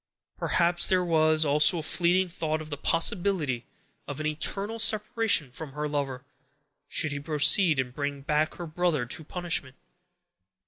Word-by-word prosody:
Perhaps 175 0 +1
there 185 -1 +1
was 155 -1 +2
also 150 +5 +3
a 160 - -4
fleeting 180 +3 +2
thought 160 -3 -4
of 155 -1 -10
the - - -3
possibility 165 - +1 0.4
of 145 0 -7
an 155 - -4
eternal 195 +8 -2
separation 215 - +2
from 140 +1 -9
her 150 +1 -4
lover, 140 -3 -4 0.6
should 155 - -1
he 145 - -4
proceed 155 +2 +4
and 125 -1 -3
bring 145 0 -4
back 150 +2 -1
her 175 - -7
brother 160 -4 -1
to 140 +6 -3
punishment. 165 -5 -2
155 Hz, 150 wpm, -26 LUFS, 145-175 Hz, 0.6 s, proceed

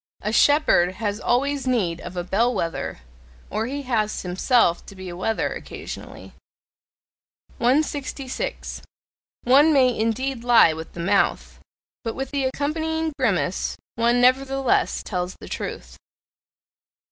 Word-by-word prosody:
A 210 +2 -1
shepherd 230 - +4
has 205 -1 -2
always 275 +2 0
need 190 -10 0
of 180 +1 -8
a 175 - -1
bell 225 +7 +1
wether 165 - -3 0.5
or 220 +3 -1
he 285 +2 -4
has 220 -5 -1
himself 180 +1 +2
to 200 - -11
be 185 -1 -8
a 175 - -7
wether 220 +5 -1
occasionally. - - -9 1.3
166. 280 - -1 0.6
One 280 +6 +6
may 255 -4 +4
indeed 230 +3 -1
lie 235 -9 +6
with 160 +1 -8
the - - -9
mouth; 195 +3 +1 0.4
but 225 -2 -3
with 270 0 -4
the 280 -2 0
accompanying 315 +4 -1
grimace 195 -7 0 0.2
one 235 +1 +2
nevertheless 270 +1 +2
tells 180 -2 -3
the - - -10
truth. - - -6
240 Hz, 125 wpm, -23 LUFS, 195-270 Hz, 1.3 s, One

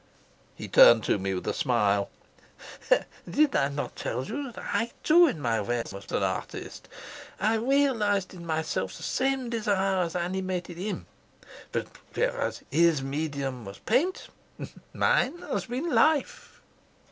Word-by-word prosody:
He - - -7
turned 115 -2 +7
to - - +1
me 95 0 -2
with 90 - -5
a - - +1
smile. 105 -6 +1 1.2
"Did 300 0 +2
I 140 - +3
not 145 +1 -5
tell 125 +3 -3
you 275 +2 -4
that - - -20 0.2
I, 230 - +1
too, 340 +2 +6
in 175 - -2
my 115 -5 0
way 120 +3 -1
was 100 0 -10
an - - 0
artist? - - -4 0.5
I 215 +2 +2
realised 225 -7 +1
in 175 -2 -10
myself 160 - -2
the - - -10
same 265 -2 -1
desire 195 -4 +1
as 170 -1 -2
animated 180 -1 -3
him. 200 +3 -4 0.7
But - - -1 0.3
whereas - - -1
his 165 -4 +3
medium 140 -3 -3
was 100 -1 -9
paint, 300 +12 0 0.6
mine 265 +7 +2
has 200 - -4
been 270 +8 -3
life." 310 -3 +1
185 Hz, 145 wpm, -27 LUFS, -, 1.2 s, turned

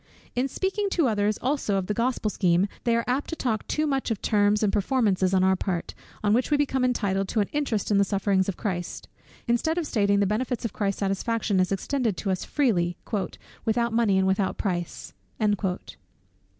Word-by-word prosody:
In 250 +2 +1
speaking 390 +6 -1
to 325 -6 +3
others 210 -1 +1
also 260 -6 0
of 190 - -1
the 210 - -1
Gospel 230 -1 0
scheme, 180 0 +2 0.2
they 235 -1 +3
are 235 - +1
apt 260 +3 -1
to 330 - -3
talk 225 -8 -2
too 305 - 0
much 270 -3 0
of 225 -4 -1
terms 205 0 +2
and 205 - +2
performances 205 -4 +2
on 190 -1 +3
our 190 0 +4
part, 180 -2 -3 0.3
on 205 0 +3
which 245 +3 +2
we 295 - +3
become 270 -3 +1
entitled 200 -6 +1
to 220 - -1
an 205 - +2
interest 260 -9 -1
in 200 - +4
the - - +5
sufferings 195 -1 +1
of 195 - -3
Christ; 175 -5 -4 0.4
instead 240 +8 +1
of 345 - 0
stating 200 -6 +2
the 200 - +3
benefits 235 +4 -1
of 225 - -3
Christ's 200 -1 -2
satisfaction 200 +1 0
as 185 0 +1
extended 225 +1 -1
to 195 - -1
us 185 - -1
freely, 180 -12 +1 0.7
"without 235 +1 +1
money 225 -4 +3
and 190 - +3
without 190 0 +1
price." 175 -4 -3
210 Hz, 195 wpm, -26 LUFS, 195-250 Hz, 0.7 s, the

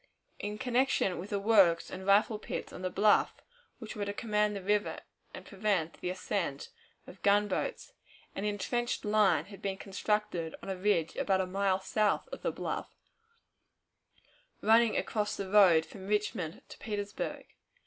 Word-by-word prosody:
In 210 +1 -4
connection 245 -5 +1
with 190 +4 -7
the 205 - -1
works 195 -5 +4
and 190 +1 -7
rifle 210 +2 +4
pits - - -6
on - - -8
the 185 - -1
bluff, 205 +3 +3 0.4
which 225 -3 -8
were 210 - -3
to 200 - -3
command 210 -1 0
the 195 - -6
river 205 +1 0 0.3
and - - -10
prevent 195 -5 -1
the 180 - -2
ascent 185 -5 -3 0.4
of 190 - -13
gunboats, 205 - +1 0.4
an 195 - -4
intrenched 215 +4 -2
line 205 -7 +3
had 200 -1 -12
been 195 -1 -2
constructed 195 -4 -2
on 195 - -4
a - - -2
ridge 180 -4 +1
about 190 -1 +1
a - - -1
mile 190 0 +1
south 210 - 0
of - - -8
the - - -1
bluff, - - -4 1.7
running 225 +1 +4
across 210 -1 -1
the 195 - -4
road 185 -5 +6
from 190 -1 -11
Richmond 205 -5 -2
to - - -12
Petersburg. 205 -2 -4
205 Hz, 160 wpm, -31 LUFS, 190-210 Hz, 1.7 s, road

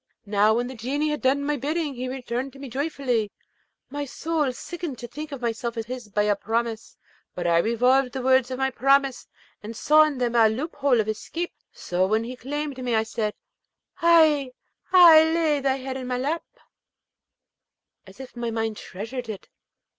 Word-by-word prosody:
Now, 210 +1 +3
when 240 +1 0
the 255 - -6
Genie 275 +6 -2
had 300 - -3
done 275 +2 +2
my 295 +1 -1
bidding, 300 +2 -2
he 255 0 -5
returned 255 0 -4
to - - -13
me 275 -1 -8
joyfully. 255 -5 -1 0.6
My 290 +1 -3
soul 300 0 -1
sickened 330 +1 -6
to 240 - -7
think 305 +4 -7
myself 235 0 -3
his 235 0 -6
by 210 +1 +1
a 210 0 +2
promise; 225 +2 -3 0.4
but - - -4
I 170 -1 +4
revolved 250 +6 +2
the 260 -2 -4
words 260 -1 +3
of 255 - -4
my 265 0 0
promise, 275 0 +2 0.3
and 220 +1 -8
saw 305 +5 +5
in 300 -3 -3
them 245 -2 -1
a 225 -2 +5
loophole 275 +1 0
of 215 - 0
escape. 330 +11 -4 0.2
So, 180 +1 -1
when 220 +3 +1
he 245 +2 -6
claimed 280 +1 -5
me, 245 -2 0
I 220 - +2
said, 220 -1 -3 0.7
'Ay! 310 -6 +4 0.4
ay! 340 -4 +9
lay 320 -2 +1
thy 270 -1 +1
head 265 0 -5
in 255 -1 -6
my 250 0 -1
lap,' 325 - -4 1.5
as 190 +5 -15
if 265 -2 -10
my 240 -1 -3
mind 225 -1 -2
treasured 225 +5 -7
it. 210 -3 -7
255 Hz, 180 wpm, -24 LUFS, 230-285 Hz, 1.5 s, ay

